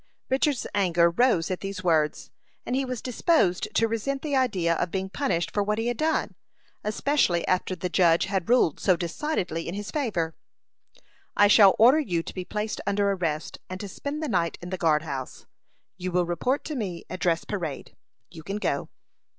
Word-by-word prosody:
Richard's 270 -1 +1
anger 175 -4 +3
rose 185 -4 +2
at 185 - -2
these 195 -1 -6
words, 155 -4 +1 0.3
and 250 - -1
he 270 - +1
was 255 -3 -5
disposed 245 - +2
to 225 - +3
resent 250 +5 -2
the 295 -3 -1
idea 190 -11 +2
of 175 +1 -1
being 190 +1 -3
punished 185 -12 -1
for 205 - 0
what 210 +1 0
he 225 - -1
had 240 -1 -1
done, 315 +3 0 0.5
especially 210 - +1
after 185 0 0
the 180 +1 -3
judge 170 -1 +3
had 190 -2 -2
ruled 240 - +3
so 185 - +3
decidedly 175 - -3
in 170 - -4
his 205 0 -5
favor. 190 - -1 1.0
"I 205 - +7
shall 200 -2 +7
order 250 +7 +6
you 175 - -1
to - - -8
be 185 - -4
placed 210 +3 -4
under 200 0 +2
arrest, 165 -5 -3
and 185 0 -6
to 205 - -5
spend 285 +10 -5
the - - -1
night 175 - 0
in 175 +1 -8
the - - -1
guard 155 -2 +2
house. 135 -5 -6 0.5
You 185 0 -4
will 180 0 +2
report 175 - -1
to 305 - -4
me 190 -9 -4
at 185 - -6
dress 170 -2 +1
parade. 170 -9 -5 0.4
You 160 -1 -10
can 195 +5 -4
go." 210 - -2
190 Hz, 190 wpm, -26 LUFS, 170-240 Hz, 1.0 s, I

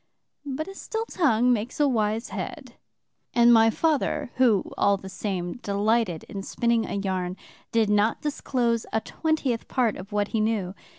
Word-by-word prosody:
But 285 +4 -3
a 390 - -7
still 445 +3 -4
tongue 250 - +2
makes 230 +4 -3
a 295 - +4
wise 220 -2 0
head, - - -6 0.6
and 240 0 +7
my 225 0 +6
father, 295 -2 0
who, 235 -7 +3
all 200 0 +3
the 190 0 -9
same, 185 -2 -3
delighted 205 -4 0
in 200 - -7
spinning 235 +3 0
a - - -4
yarn, 185 -2 -2 0.3
did 225 -2 +3
not 210 +2 +2
disclose 245 -5 -1
a 220 - +1
twentieth 295 -7 -1
part 240 -5 +1
of 195 +3 -10
what 205 0 0
he 225 - -1
knew. 215 -4 0
225 Hz, 165 wpm, -26 LUFS, 200-250 Hz, 0.6 s, and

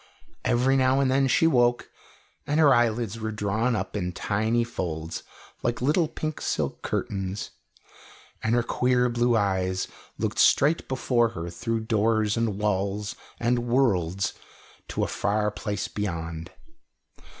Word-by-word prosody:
Every 130 +3 +3
now 130 +1 +3
and 135 -2 +2
then 135 0 +3
she 150 - +3
woke, 120 -6 +2 0.6
and 150 +2 +1
her 145 -3 +7
eyelids 115 -2 +1
were 110 0 -3
drawn 110 +3 0
up 95 -1 -3
in 90 -3 -2
tiny 110 +5 0
folds 85 -8 -4 0.4
like 120 0 -1
little 155 +6 +2
pink 155 0 -5
silk - - -2
curtains, 95 0 -3 0.9
and 115 +1 +1
her 120 - +2
queer 125 +1 +2
blue 120 0 +2
eyes 95 -2 0 0.3
looked - - -2
straight 150 +4 +4
before 125 -3 +1
her 85 +1 -4
through 115 +5 -2
doors 110 -1 +1
and 115 -4 0
walls 105 +1 -1 0.2
and 120 +1 +2
worlds 100 -8 +1 0.5
to - - -2
a - - 0
far 105 +1 0
place 100 -3 -3
beyond. 85 -5 -4
110 Hz, 140 wpm, -26 LUFS, 100-125 Hz, 0.9 s, her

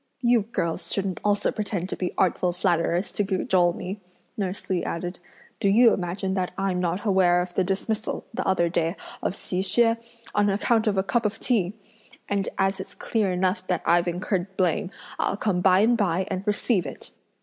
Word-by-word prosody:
"You 240 -1 +4
girls 170 -6 -3
shouldn't 195 -2 -1
also 205 -1 +2
pretend 200 -4 -3
to - - -2
be 180 - -2
artful 180 -1 +2
flatterers 175 0 +1
to 205 - 0
cajole 185 -2 +2
me!" 190 +3 -6 0.3
nurse 195 -2 -4
Li 185 -2 0
added; 175 +2 -4 0.4
"do 200 - +2
you 230 +4 +6
imagine 190 +1 -2
that 185 -2 0
I'm 195 -2 0
not 180 +4 -1
aware 185 -3 +4
of 180 0 -3
the 190 - +2
dismissal, 210 +4 -2
the 255 - -2
other 185 -3 +3
day, 170 0 0 0.3
of - - -1
Hsi 185 -1 -3
Hsüeh, 230 +4 +3 0.4
on 205 0 +3
account 220 +3 +2
of 200 -2 +1
a 190 - +3
cup 235 +4 0
of 210 0 -2
tea? 205 -7 +1 0.5
and 200 -1 0
as 195 0 +1
it's 190 - -8
clear 210 -4 0
enough 185 +1 0
that 180 - -1
I've 170 +1 +3
incurred 185 +2 -2
blame, 180 -1 +1 0.3
I'll - - 0
come 195 -4 0
by 185 +1 +5
and 235 +3 +4
by 190 -4 +1
and 190 +3 -3
receive 205 - +1
it!" 135 - -7
190 Hz, 190 wpm, -25 LUFS, 180-205 Hz, 0.5 s, you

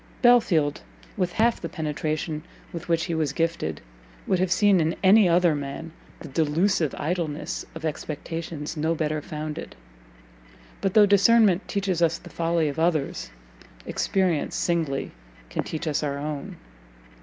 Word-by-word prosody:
Belfield, 215 -12 +4 0.3
with 180 -1 -1
half 230 +1 +2
the - - -4
penetration 155 -1 -3 0.3
with 170 0 -7
which 165 -1 +2
he 170 0 -2
was 155 -4 0
gifted, 165 - -1 0.4
would 185 - +1
have 185 -1 +1
seen 200 -2 +4
in 160 +1 0
any 195 0 +6
other 175 -1 +4
man 145 +3 -5 0.3
the - - -7
delusive 160 +2 +1
idleness 160 -2 -3
of 160 0 -6
expectations 155 0 -4
no 160 +2 0
better 155 -1 -1
founded; 155 -2 -6 1.1
but 195 - -1
though 215 -1 +8
discernment 205 -1 +4
teaches 195 -4 -1
us 165 -1 +3
the - - -13
folly 165 -1 +1
of 145 +2 -3
others, 160 - 0 0.6
experience 185 -6 0
singly 160 -6 -1 0.4
can - - -2
teach 160 +2 -5
us 150 - 0
our 140 -2 -2
own! 145 0 -5
165 Hz, 145 wpm, -25 LUFS, 150-180 Hz, 1.1 s, though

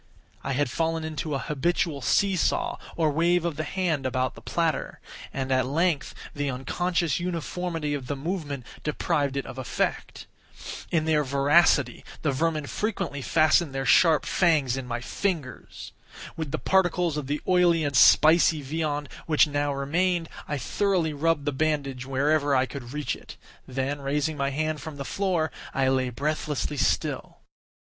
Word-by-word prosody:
I 135 - -2
had 135 -1 0
fallen 165 +2 -1
into 155 -1 -3
an 135 - -2
habitual 150 0 -1
see 195 - +2
saw, 180 - 0 0.2
or 160 -2 +2
wave 170 +3 +2
of 170 -3 -1
the 155 - -3
hand 170 -6 -1
about 130 -2 -1
the - - -13
platter; - - -1 0.3
and, 135 -1 -3
at 130 -1 +2
length, 155 0 0 0.2
the 145 -1 -2
unconscious 170 +6 -1
uniformity 170 -2 -3
of 135 -3 -4
the 145 - -2
movement 145 -4 -4 0.2
deprived 145 -2 0
it 140 - -2
of 130 0 -8
effect. 130 - -3 0.6
In 160 -2 +1
their 155 -2 +2
voracity 140 +5 +3 0.2
the 150 - +2
vermin 155 +2 0
frequently 195 -7 -3
fastened 155 0 +3
their 135 0 -2
sharp 160 0 +5
fangs 155 -8 +2
in 135 -2 -5
my 120 0 -3
fingers. 160 -3 -4 0.4
With 160 -3 -4
the 155 - -2
particles 175 -2 +2
of 150 -3 -4
the 145 +1 -1
oily 175 -3 +4
and 145 -2 -1
spicy 155 +3 +6
viand 150 0 -2 0.2
which 155 -1 +5
now 145 -1 -1
remained, 165 +5 0 0.2
I 145 - -2
thoroughly 175 - 0
rubbed 150 0 0
the 145 - +1
bandage 140 -3 -1
wherever 145 +1 +2
I 130 0 +3
could 125 -2 -8
reach 150 0 -2
it; - - -12 0.3
then, 135 +2 -2
raising 150 +3 -1
my 140 -1 0
hand 155 +1 -2
from 155 0 -7
the 140 - -5
floor, 180 -4 0 0.2
I 135 -1 +2
lay 130 -1 +1
breathlessly 150 +2 -2
still. - - -1
150 Hz, 160 wpm, -26 LUFS, 140-165 Hz, 0.6 s, spicy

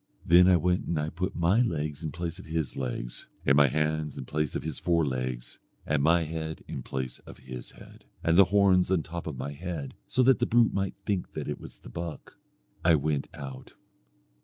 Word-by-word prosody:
Then 90 +1 +7
I 90 -1 +6
went 90 +2 +1
and 85 - 0
I 75 +1 -2
put 90 +3 -3
my 90 +7 +3
legs 75 - -1
in 80 -2 -3
place 85 +3 -4
of 95 - -11
his 80 -4 -2
legs, - - -4 0.2
and 70 - +5
my 70 0 +7
hands 75 +1 -1
in 65 - -5
place 75 +2 -2
of - - -2
his 80 - -4
forelegs, 65 -8 -1 0.3
and 75 -1 +1
my 85 +3 +4
head 80 0 -5
in - - -5
place 65 0 -4
of - - -13
his 65 -2 -8
head, - - -15 0.2
and 85 - +3
the 100 +2 +8
horns 95 -1 +4
on 90 -4 +2
top 85 +2 -6
of 75 -5 -4
my 70 - -4
head, 75 -2 -5
so 130 - +2
that 130 0 +5
the - - +1
brute 120 -1 +4
might 95 -1 -1
think 100 -4 -2
that - - -4
it - - -3
was - - -11
the - - -13
buck. 85 +4 -7 0.5
I 85 -1 +6
went 75 -1 0
out. 65 -2 -8
80 Hz, 210 wpm, -28 LUFS, 70-90 Hz, 0.5 s, the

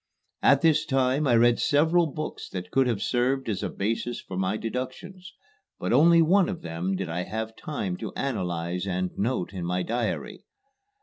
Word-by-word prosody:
At 140 0 +5
this 155 -2 +4
time 135 0 +1
I 120 - +4
read 120 +1 +4
several 160 +4 +3
books 155 +1 -6
that 90 0 -6
could 135 -1 +3
have 115 -5 -1
served 130 +2 0
as 100 -4 -2
a - - -2
basis 115 +4 -2
for 95 - -8
my 95 +3 0
deductions, 130 - -6 0.5
but - - -1
only 170 +1 +6
one 185 +4 +4
of 185 -4 -5
them 85 +3 -2
did 95 -1 -3
I 85 +2 -2
have 110 +4 -4
time 100 -12 -4
to 110 -4 -5
analyze 90 -7 -2
and 90 -1 -1
note 100 -3 -1
in 90 -2 -5
my 90 +1 -1
diary. 125 - -3
120 Hz, 180 wpm, -26 LUFS, 95-145 Hz, 0.5 s, only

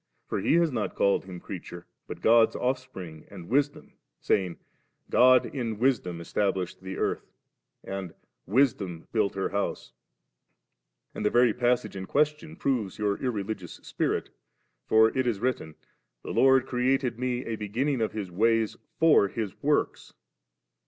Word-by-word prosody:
For - - -2
he 95 - +2
has 170 -2 +3
not 110 -5 -3
called 100 -1 +2
Him 90 -2 -8
creature, 90 -2 -8 0.2
but - - -8
God's 115 0 +5
Offspring 125 -11 -4
and 90 -4 -10
Wisdom, 145 +3 0 0.3
saying, 90 -4 0 0.5
'God 130 0 +6
in 115 -6 -4
Wis 125 +1 +3
dom 90 -2 -7
established 95 +1 -2
the 95 0 -6
earth,' - - -2 0.5
and 95 -3 -6 0.3
'Wisdom 100 -7 +1
built 105 -4 +1
her 95 - -1
an - - -18
house*/ 100 +1 -3 1.2
And - - -5
the 105 - +3
very 120 -1 +4
pas 120 +1 +2
sage 105 - -9
in 95 -1 -6
question 150 +2 0
proves 120 -9 -1
your 105 -2 0
irreligious 105 -7 -3
spirit; - - -2 0.6
for 110 0 +4
it 130 -1 +1
is 110 -5 0
written, 115 -10 -2 0.5
'The - - -5
Lord 130 -1 +4
created 125 -1 0
me 125 0 -2
a 115 - -3
banning 120 +6 -1
of 110 - -1
His 100 -4 -5
ways 115 +3 +1 0.2
for 160 -10 +5
His 105 -1 -5
works. - - 0
110 Hz, 150 wpm, -27 LUFS, 95-130 Hz, 1.2 s, God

